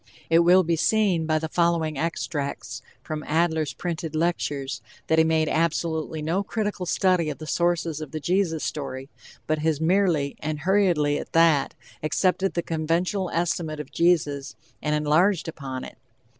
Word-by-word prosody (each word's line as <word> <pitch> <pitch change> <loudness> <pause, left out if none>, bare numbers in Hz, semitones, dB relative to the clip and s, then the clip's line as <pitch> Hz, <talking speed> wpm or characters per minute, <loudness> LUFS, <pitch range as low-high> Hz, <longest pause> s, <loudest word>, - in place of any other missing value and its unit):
It 165 - +6
will 180 +2 +6
be 165 0 +1
seen 185 -2 +2
by 155 -1 +2
the 160 +1 -2
following 170 -2 +1
extracts 150 -2 -3 0.2
from 155 -1 -4
Adler's 160 -1 +1
printed 165 -2 -4
lectures 150 -4 -1 0.2
that 160 - +2
he - - +8
has 160 - +2
made 160 -1 +2
absolutely 160 -1 -1
no 170 +5 0
critical 205 -3 -3
study 180 -3 +2
of 150 - -5
the 155 - -8
sources 170 -1 0
of 155 - -6
the 155 - -5
Jesus 170 0 0
story, 135 -2 -5 0.3
but 155 0 0
has 155 -1 0
merely, 165 -4 +1
and 150 0 -4
hurriedly 175 -6 +2
at - - -9
that, 165 -4 +4 0.3
accepted 185 +5 +1
the 170 - 0
conventional 170 +4 -1
estimate 160 -2 -1
of 150 - -7
Jesus 150 -5 +1 0.3
and 150 0 0
enlarged 160 +5 +2
upon 135 -5 -6
it. - - -11
160 Hz, 160 wpm, -25 LUFS, 150-175 Hz, 0.3 s, he